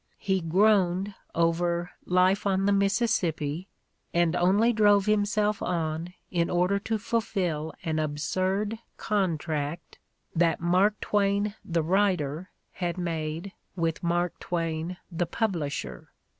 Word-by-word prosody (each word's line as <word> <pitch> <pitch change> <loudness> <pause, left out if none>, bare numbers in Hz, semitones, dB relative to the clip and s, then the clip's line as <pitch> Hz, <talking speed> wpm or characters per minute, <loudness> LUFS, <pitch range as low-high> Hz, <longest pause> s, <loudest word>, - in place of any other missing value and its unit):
He 190 -2 0
groaned 190 +2 +3 0.2
over 170 +1 +1 0.2
"Life 185 +2 +3
on 195 0 +1
ithe 200 - +4
Mississippi" 195 -6 0 0.5
and 170 0 +3
only 200 +7 +3
drove 205 -2 +4
himself 210 0 +1
on 165 0 -2 0.2
in 170 -2 +1
order 180 +3 +2
to 220 +2 -1
fulfill 190 -8 -2
an 160 -1 -1
absurd 185 +8 -1 0.2
contract 160 -6 -2 0.4
that 165 0 +2
Mark 185 +5 +2
Twain 205 0 +1
the 165 -2 0
writer 180 -3 +1 0.2
had 175 -1 -3
made 165 +1 -3 0.2
with 165 -2 -1
Mark 175 0 0
Twain 165 0 -2
the 170 0 -1
publisher. 155 - -3
180 Hz, 115 wpm, -27 LUFS, 165-200 Hz, 0.5 s, ithe